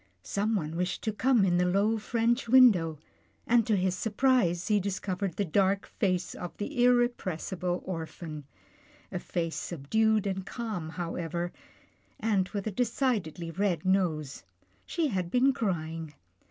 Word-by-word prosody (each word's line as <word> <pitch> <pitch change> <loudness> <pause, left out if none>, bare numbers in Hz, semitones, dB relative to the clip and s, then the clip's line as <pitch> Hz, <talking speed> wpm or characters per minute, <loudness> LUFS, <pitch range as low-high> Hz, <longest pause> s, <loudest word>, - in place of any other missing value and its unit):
Someone 200 -6 -1
wished 180 +2 -2
to 220 - -1
come 240 -1 +3
in 175 -2 +2
the 180 - +3
low, 205 +5 +2
French 235 +2 0
window, 205 -11 +6 0.5
and 230 -2 +3
to 220 - +3
his 185 0 +1
sur 225 - -2
prise, 205 -7 +2
he 210 -2 +3
discovered 195 -1 -3
the 205 - 0
dark 195 +4 +2
face 185 -3 -1
of 175 - -7
the 245 +5 -2
irrepressi 240 -8 +1
ble 180 0 -1
orphan. 160 -4 -6 0.7
A - - -3
face 165 -2 -3
subdued 215 +7 +1
and 190 -1 -2
calm 210 -7 -5
however, 170 +1 -3 0.7
and 205 -4 +1
with 200 -2 -4
a 215 - -1
decidedly 210 - -1
red 180 -2 -1
nose. 165 - 0 0.4
She 325 -3 0
had 185 -6 -2
been 260 +6 +3
crying. 165 - -3
190 Hz, 145 wpm, -29 LUFS, 175-225 Hz, 0.7 s, window